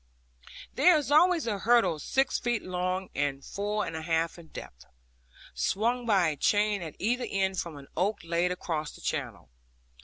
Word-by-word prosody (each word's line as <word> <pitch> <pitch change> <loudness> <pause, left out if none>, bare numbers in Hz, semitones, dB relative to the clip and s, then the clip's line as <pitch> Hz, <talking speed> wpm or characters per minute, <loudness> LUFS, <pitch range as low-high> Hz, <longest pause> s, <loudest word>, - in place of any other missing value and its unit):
There 355 -3 +5
is 290 -1 -3
always 335 +1 +5
a 210 -4 -1
hurdle 220 -8 +3
six 265 - +1
feet 240 -3 -1
long 185 +1 -2
and 140 -1 -2
four 210 +1 -2
and - - -5
a 160 - -4
half 165 +1 -1
in 165 - -13
depth, 60 - -10 0.7
swung 230 - 0
by 190 -6 +4
a 150 - -3
chain 205 +5 +2
at 160 -3 -7
either 245 +4 0
end 190 -1 0
from 165 -4 -5
an 140 - -11
oak 195 +5 0
laid 170 +2 0
across 160 -4 -3
the - - -14
channel. 65 - -4
190 Hz, 175 wpm, -29 LUFS, 165-230 Hz, 0.7 s, There